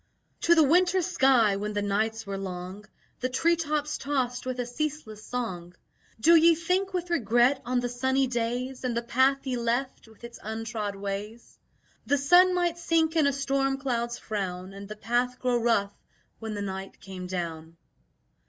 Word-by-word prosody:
To 340 - +5
the 320 - +6
winter 360 +5 +3
sky 260 - +3
when 210 +1 -3
the 205 0 -1
nights 220 +2 -1
were 200 0 -4
long 185 +1 -6 0.3
The 255 - -1
tree 330 +7 +2
tops 300 -2 -2
tossed 255 -3 -2
with 255 -1 -3
a 245 - -1
ceaseless 245 -4 -4
song: 180 -8 -5 0.4
"Do 335 +9 +6
ye 330 +1 +6
think 365 +4 0
with 355 -1 -3
regret 245 -1 +3
on 250 0 0
the 245 - -1
sunny 260 +2 +1
days 250 +2 -3
And 245 -2 -1
the 235 - -1
path 260 +4 +2
ye 255 -2 -1
left, 240 +2 -2
with 220 +1 -20
its 235 0 -9
untrod 220 -1 -4
ways? 200 +3 -6 0.5
The 285 - +3
sun 355 +6 +5
might 345 -1 0
sink 330 -1 +1
in 310 -3 +4
a - - +3
storm 270 0 0
cloud's 240 -3 -2
frown 190 -3 -4
And 200 0 -9
the 215 - -6
path 245 +3 -1
grow 245 -2 0
rough 205 -4 +1 0.5
when 220 -1 -5
the 205 - -3
night 195 0 -6
came 185 -2 -8
down." 165 -2 -5
245 Hz, 175 wpm, -27 LUFS, 210-280 Hz, 0.5 s, the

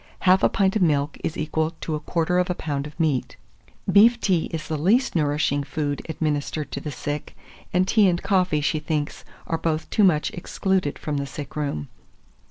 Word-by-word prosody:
Half 185 +1 +5
a - - +4
pint 195 -1 +1
of 215 - +1
milk 150 -3 +1
is 160 - -2
equal 160 +1 -1
to 160 - -3
a 150 - -1
quarter 170 +3 0
of 180 - 0
a 180 - 0
pound 145 -3 -3
of 150 +3 -14
meat. 150 -6 0 0.5
Beef 230 +4 +6
tea 185 -7 +1
is 160 -1 -5
the 160 - -2
least 205 - +2
nourishing 145 -2 +1
food 145 0 -3
administered 150 -2 -2
to - - -3
the 150 - -5
sick; 145 +2 -5 0.3
and 185 +1 +2
tea 205 -1 +5
and 175 -1 0
coffee, 180 -6 +1
she 155 +1 0
thinks, 150 -1 -3 0.2
are 165 - -2
both 160 -1 -1
too 215 - +3
much 160 -6 +3
excluded 185 -3 -1
from 150 -2 -3
the 140 0 -2
sick 140 0 -8
room. 140 - -2
155 Hz, 195 wpm, -24 LUFS, 145-180 Hz, 0.5 s, Beef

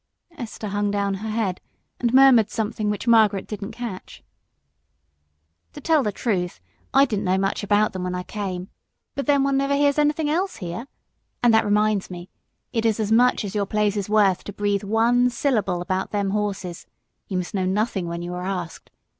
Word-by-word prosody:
Esther 225 -6 -6
hung 205 +1 0
down 200 -1 0
her 210 +3 -5
head 215 -4 -2 0.4
and 240 -1 +1
murmured 255 -5 +6
something 215 -1 -2
which 210 +3 -3
Margaret 215 -4 +4
didn't 200 -1 -6
catch. 225 -6 -7 1.5
"To - - -9
tell 320 -3 +3
the 210 - -1
truth, 185 -5 -2 0.3
I 275 +1 +5
didn't 210 -7 -2
know 185 +1 +2
much 195 +1 -1
about 205 +1 +2
them 185 -1 -4
when 180 0 -2
I 180 - -3
came, 185 -2 -5 0.4
but 275 - -4
then 280 -2 +4
one 275 0 +1
never 275 +1 +1
hears 285 +1 +2
anything 300 +1 +1
else 360 +6 0
here. 180 +6 -6 0.6
And 240 -2 +5
that 220 0 +4
reminds 210 -1 +1
me 175 0 -9 0.4
it 225 - 0
is 225 -1 +1
as 215 -1 -1
much 245 0 +4
as 195 - -5
your 205 -2 -1
place 210 0 +1
is 205 -1 -3
worth 205 -4 +3
to 205 - -6
breathe 205 0 -1
one 230 +4 +3
syllable 215 -8 0
about 185 +1 -2
them 200 -2 -1
horses; 200 -4 -3 0.4
you 190 - -2
must 180 -1 -4
know 190 -2 0
nothing 195 -2 -1
when 170 0 -4
you 175 +1 -5
are 180 - -4
asked. 180 -3 -5
210 Hz, 190 wpm, -23 LUFS, 190-235 Hz, 1.5 s, murmured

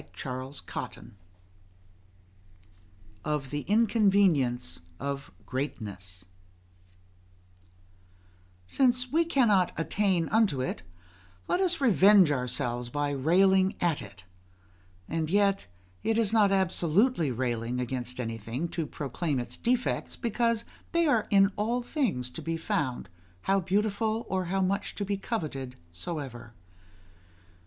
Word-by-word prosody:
CHAPTER 130 +6 -5 0.2
VII - - -6 2.1
OF 145 -3 -2
THE 145 - -1
INCONVENIENCE 195 - +2 0.2
OF 140 0 -4
GREATNESS 100 -9 -5 2.4
Since 250 - +2
we 330 +3 +4
cannot 225 - +3
attain 180 0 +1
unto 215 - +2
it, 130 -9 -2 0.7
let - - +1
us 365 -3 +2
revenge 200 - +6
our 125 -3 -1
selves 120 0 -2
by 145 +2 -1
railing 185 +7 +3
at 170 -4 +1
it; 95 -3 -12 0.8
and 160 -1 -2
yet 200 +1 +2 0.3
it 225 0 +1
is 225 -2 +2
not 210 -3 +5
absolutely 190 - +2
railing 120 -1 -2
against 125 0 -3
anything 115 +6 -3
to 165 -3 -3
proclaim 145 +1 -2
its 120 - -5
defects, 245 +1 -1
because 230 0 0 0.3
they 340 0 +3
are 235 -8 +2
in 195 0 +5
all 235 +4 0
things 205 - -1
to - - -7
be 165 0 -2
found, 130 -8 -2 0.3
how 195 - +2
beautiful 210 +4 0
or 185 -1 0
how 190 +2 0
much 195 +2 -1
to 205 - -3
be 200 0 -1
coveted 150 - -4 0.2
soever. 120 - -6
175 Hz, 115 wpm, -28 LUFS, 130-210 Hz, 2.4 s, revenge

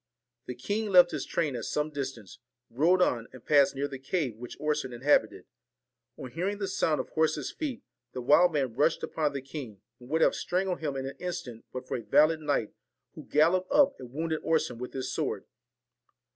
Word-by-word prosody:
The 125 - -5
king 205 - -2
left 180 -2 +7
his 150 - -4
train 150 -6 -1
at 120 - -4
some 150 +1 -1
distance, 130 -9 -6 0.3
rode 170 +9 +4
on, 115 -7 0
and 130 -2 -13
Sassed 140 -2 +5
near 140 +1 -1
the 135 -2 -8
cave 135 - -2
which 120 +2 -9
Orson 150 -3 -1
inhabited, 130 +5 +2 0.7
n 130 - -8
hearing 190 +7 -2
the 200 -1 -3
sound 160 -5 +1
of - - -4
horses' 155 -3 0
feet, 280 -7 -5 0.3
the 125 - -4
wild 170 +7 +6
man 135 -6 -1
rushed 145 +6 +1
upon 150 -2 -1
the 140 -2 -4
king, 135 -7 -8 0.2
and 125 0 -14
would 160 +2 +1
have - - +5
strangled 185 0 -1
him 145 -3 -3
in 135 0 -3
an 135 - -6
instant 170 -11 -6
but 130 0 -7
for - - -2
a - - -6
valiant 155 +9 +4
knight, 145 -8 -1 0.4
who - - -11
galloped 175 +5 +2
up 285 -1 +5
and 125 - -10
wounded 160 +2 -2
Orson 155 -7 0
with 125 - -6
his 130 -1 -3
sword. 100 - -2
150 Hz, 200 wpm, -29 LUFS, 130-165 Hz, 0.7 s, left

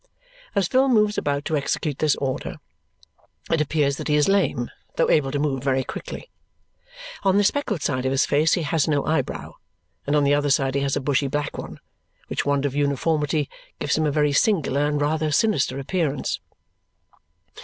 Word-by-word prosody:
As 195 -3 +2
Phil 260 +5 +3
moves 210 -3 +3
about 145 0 -2
to 160 - 0
execute 145 0 -2
this 155 -2 +3
order, 130 -2 -3 1.0
it 165 -2 +3
appears 145 -2 +1
that - - -5
he 150 - +2
is 150 -1 +3
lame, 175 -11 +1 0.2
though - - +2
able 140 -3 +3
to 145 - -2
move 140 -3 -1
very 135 -1 +1
quickly. - - -8 0.9
On 195 0 +3
the 205 - +4
speckled 210 - 0
side 130 -3 -1
of - - 0
his 135 - +2
face 150 +3 +2
he 175 - +1
has 155 0 +1
no 145 -3 +1
eyebrow, 160 +1 -2 0.5
and 145 - +2
on 145 - +3
the 140 0 +3
other 145 0 +1
side 135 -1 +2
he 140 - 0
has 140 -1 0
a - - -1
bushy 140 0 +1
black 145 +1 -2
one, - - -8 0.5
which - - -2
want 140 0 +1
of 140 - -1
uniformity 145 +1 0 0.3
gives 140 - 0
him 155 0 +1
a - - +1
very 150 0 +2
singular 145 -5 +2
and 150 0 0
rather 155 +1 0
sinister 145 - +1
appearance. 145 0 -1
145 Hz, 185 wpm, -23 LUFS, 140-160 Hz, 1.0 s, the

